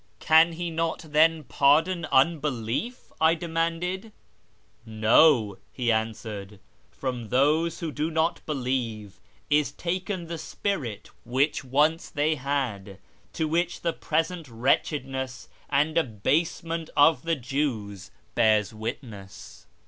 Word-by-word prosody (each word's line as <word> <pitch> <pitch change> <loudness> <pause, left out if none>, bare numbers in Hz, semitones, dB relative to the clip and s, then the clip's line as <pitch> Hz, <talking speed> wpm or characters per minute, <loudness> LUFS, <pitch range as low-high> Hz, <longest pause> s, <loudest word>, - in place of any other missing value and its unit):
" - - -39
Can 160 +2 +6
He 170 +1 -4
not 165 0 -2
then 160 +1 +3
pardon 160 +6 +2
unbelief? 145 - 0
" - - -31
I 160 +1 +5
demanded. 170 +5 -2 0.4
" 110 +1 -39
No," 110 -1 +4
he 120 -2 0
answered, 110 -2 -3 0.2
" - - -37
from 125 -4 -4
those 155 - +2
who 165 -2 -3
do 150 +2 -2
not 160 +1 0
believe 120 - -3 0.3
is 150 -1 +3
taken 180 +3 -3
the 165 0 -6
spirit 145 - -4
which 135 +5 0
once 150 +5 +1
they 150 +2 +1
had, 130 -9 -3 0.4
to 160 - -1
which 170 +2 -1
the 170 -1 0
present 165 +1 -2
wretchedness 130 +2 -1 0.2
and 150 +3 +1
abasement 160 +6 -1
of 150 +2 +5
the 165 0 0
Jews 120 - -3 0.2
bears 110 -1 +3
witness." 110 -4 -8
145 Hz, 125 wpm, -26 LUFS, 115-165 Hz, 0.4 s, Can